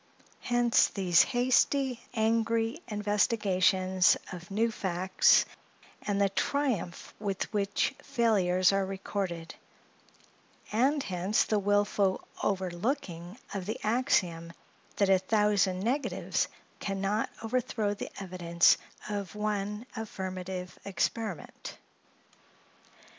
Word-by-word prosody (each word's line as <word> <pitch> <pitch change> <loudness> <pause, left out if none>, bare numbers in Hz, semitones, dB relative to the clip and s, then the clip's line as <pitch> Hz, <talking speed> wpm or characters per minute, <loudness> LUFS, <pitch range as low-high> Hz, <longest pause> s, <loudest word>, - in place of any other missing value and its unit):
Hence, 240 -1 +3
these 180 -4 +3
hasty, 255 +1 +2 0.2
angry 225 +3 +1
investigations 195 -3 +2
of 175 -2 -9
new 225 +3 +1
facts, 185 -2 +3 0.6
and 205 -1 -1
the 200 - +4
triumph 225 -5 -2
with 200 +1 -3
which 200 -1 0
failures 200 -8 +2
are 195 0 +2
recorded; 190 -3 -4 1.2
and 270 +6 +2
hence 185 +2 +1
the 215 - 0
wilful 205 -1 +1
overlooking 185 - -2 0.2
of 195 -2 -4
the 215 - -2
axiom 190 -9 +1 0.4
that 200 -1 +2
a 190 -1 +5
thousand 200 -2 +2
negatives 260 +7 -1 0.3
can 195 -1 -3
not 205 +3 0
overthrow 225 -3 -1
the 205 - -6
evidence 175 -3 +3 0.3
of 205 -1 -4
one 210 +1 -2
affirmative 185 -4 -5
experiment. 200 -1 -3
200 Hz, 95 wpm, -29 LUFS, 185-225 Hz, 1.2 s, a